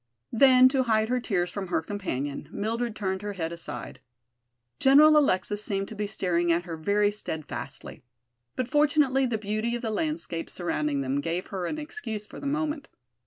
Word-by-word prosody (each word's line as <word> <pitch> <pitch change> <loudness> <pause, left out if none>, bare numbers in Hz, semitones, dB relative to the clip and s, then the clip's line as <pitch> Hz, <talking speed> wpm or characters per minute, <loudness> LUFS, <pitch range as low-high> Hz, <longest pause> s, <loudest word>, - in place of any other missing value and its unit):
Then, 255 +1 +7
to 265 0 +1
hide 220 -3 +2
her 250 0 +1
tears 180 -7 -1
from 200 -2 -4
her 165 -2 0
companion, 145 -8 -4
Mildred 230 +2 -2
turned 190 -2 -2
her 205 0 -4
head 165 -4 -3
aside. 170 0 -7 0.8
General 300 +3 +7
Alexis 210 -7 +2
seemed 195 -2 -2
to 220 - -8
be 210 0 -2
staring 175 -4 0
at 170 +1 +2
her 170 -2 -6
very 205 +6 +2
steadfastly. 160 -7 -6 0.5
But 255 - -1
fortunately 290 -2 +3
the 235 -2 -1
beauty 215 +3 -2
of 240 - -5
the 225 - -1
landscape 305 - -3
surrounding 150 -5 -1
them 135 +1 -1
gave 170 +4 -2
her 185 -3 -3
an 310 - -3
excuse 295 - -5
for - - -11
the 280 - -4
movement. 300 0 -2
210 Hz, 175 wpm, -27 LUFS, 175-255 Hz, 0.8 s, Then